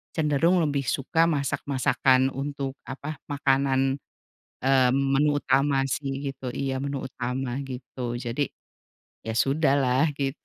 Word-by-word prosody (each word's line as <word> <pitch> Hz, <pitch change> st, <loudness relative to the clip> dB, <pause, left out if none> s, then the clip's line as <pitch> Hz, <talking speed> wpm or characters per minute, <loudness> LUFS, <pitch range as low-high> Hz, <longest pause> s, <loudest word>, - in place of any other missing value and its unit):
cenderung 160 Hz, +3 st, +3 dB
lebih 140 Hz, -3 st, 0 dB
suka 150 Hz, +6 st, +2 dB
masak-masakan 135 Hz, -3 st, +2 dB
untuk 140 Hz, 0 st, -4 dB
apa, 140 Hz, +3 st, -6 dB
makanan, 135 Hz, -1 st, +1 dB, 0.7 s
eee, 130 Hz, -2 st, +4 dB
menu 140 Hz, +2 st, +2 dB
utama 135 Hz, +1 st, +2 dB
sih 135 Hz, 0 st, -2 dB
gitu. 135 Hz, -1 st, -7 dB
Iya 135 Hz, -1 st, -2 dB
menu 140 Hz, -1 st, -3 dB
utama 125 Hz, 0 st, -3 dB
gitu, 125 Hz, -1 st, -5 dB
jadi 120 Hz, +3 st, -2 dB, 0.8 s
ya 110 Hz, -, -2 dB
sudahlah 135 Hz, 0 st, +3 dB
gitu. 135 Hz, 0 st, -2 dB
135 Hz, 115 wpm, -26 LUFS, 130-140 Hz, 0.8 s, eee